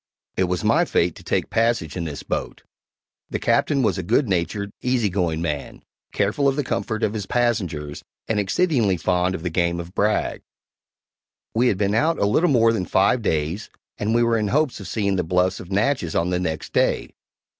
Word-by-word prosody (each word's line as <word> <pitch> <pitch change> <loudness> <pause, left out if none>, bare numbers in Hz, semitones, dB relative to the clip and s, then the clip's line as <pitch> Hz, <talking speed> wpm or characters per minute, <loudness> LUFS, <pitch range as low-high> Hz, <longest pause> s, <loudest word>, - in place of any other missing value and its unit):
It 95 - +2
was 90 +1 -2
my 145 +11 +4
fate 85 - +1
to - - -13
take - - -1
passage 115 -9 +1
in 85 -2 -3
this 75 -3 -6
boat. - - -4 0.7
The - - -2
Captain 140 -3 +2
was 100 -4 +1
a - - 0
good 115 - +1
natured, 100 +2 -1
easy 125 -4 +1
going 85 -3 -1
man, 75 -4 -4 0.3
careful 105 +8 +1
of 135 - +2
the 145 - 0
comfort 110 -3 -2
of 105 - +1
his 105 -3 -4
passengers, 90 -12 -1 0.3
and 110 -2 0
exceedingly 110 - +1
fond 90 +2 +1
of 80 - -7
the 90 - -2
game 85 0 0
of 85 +1 -8
brag. 105 +1 0 1.1
We 120 +3 +3
had 100 - +2
been 100 0 +1
out 155 +9 +2
a - - +1
little 160 +12 +3
more 115 -4 +4
than 95 -5 -1
five 100 +8 +2
days, 80 +1 -1 0.3
and 110 +2 0
we 120 - +4
were 115 -1 +2
in 105 - 0
hopes 145 +2 +1
of 100 - -8
seeing 100 -3 0
the 90 - +1
bluffs 90 +2 +1
of 90 - -10
Natchez 105 - 0
on 85 +2 +1
the 90 - +1
next 80 -4 -4
day. - - +1
100 Hz, 200 wpm, -23 LUFS, 90-115 Hz, 1.1 s, my